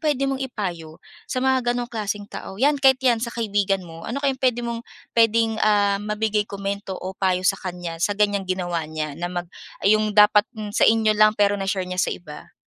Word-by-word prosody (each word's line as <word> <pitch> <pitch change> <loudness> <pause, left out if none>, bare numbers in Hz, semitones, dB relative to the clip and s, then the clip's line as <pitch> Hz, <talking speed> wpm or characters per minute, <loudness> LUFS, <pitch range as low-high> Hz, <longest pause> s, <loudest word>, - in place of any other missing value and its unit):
puwede 290 -3 0
mong 270 -1 -1
ipayo 180 -11 -5 0.3
sa 255 0 -2
mga 260 -1 +3
gano'ng 245 0 -2
klaseng 205 -2 -3
tao? 190 -1 -9
'Yan 280 +4 +2
kahit 265 -1 +6
'yan 235 -3 +3
sa 235 - -2
kaibigan 200 -5 -1
mo, 165 +2 -10
ano 280 +4 -4
kayang 265 -1 0
puwede 245 -2 +1
mong, 235 -1 -3 0.3
puwedeng, 225 -1 +2
ah, 205 -2 +3
mabigay 210 0 -1
komento 200 -1 -4
o 185 +1 -6
payo 185 -1 0
sa 195 0 +2
kaniya 175 -2 -6
sa 200 +3 0
ganiyang 205 -2 +1
ginawa 175 -4 -2
niya 155 -1 -4
na 175 - -2
mag 175 0 -4 0.4
iyong 215 0 +3
dapat 210 0 +6
in 210 -1 -6
sa - - +4
inyo 220 -1 +3
lang 215 0 +4
pero 205 -1 +2
na-share 195 -1 -1
niya 180 0 -2
sa - - +1
iba? 150 -4 -8
205 Hz, 205 wpm, -23 LUFS, 185-230 Hz, 0.4 s, kahit